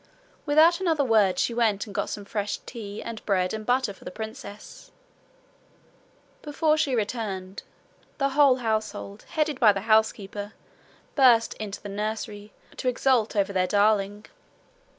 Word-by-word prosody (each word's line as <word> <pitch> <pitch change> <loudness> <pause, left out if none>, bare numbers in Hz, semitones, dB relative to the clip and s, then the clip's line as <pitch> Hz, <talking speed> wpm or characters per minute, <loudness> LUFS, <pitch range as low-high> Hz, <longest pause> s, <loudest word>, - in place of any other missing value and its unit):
Without 320 +4 +5
another 325 -6 +1
word 215 -7 +3
she 235 - 0
went 225 -4 +1
and 205 - -11
got - - -2
some 205 - -6
fresh 205 0 -3
tea 210 -4 -7
and 230 -1 -7
bread 185 -2 0
and 215 -1 -6
butter 250 -4 +1
for - - -18
the - - -6
princess. 220 0 -9 1.5
Before 305 +1 +1
she 290 -4 0
returned, 205 -4 -3 0.6
the 275 -1 +1
whole 275 -1 +5
household, 215 -3 -3
headed 305 -3 -1
by 220 -4 +7
the 195 -1 -3
housekeeper, 215 -1 0 0.6
burst 245 -5 +5
into 205 -2 -6
the 205 - -6
nursery 210 0 -5 0.3
to - - -4
exult 250 -3 +2
over 200 -1 +1
their 185 -1 +1
darling. 205 0 +1
220 Hz, 145 wpm, -26 LUFS, 205-255 Hz, 1.5 s, by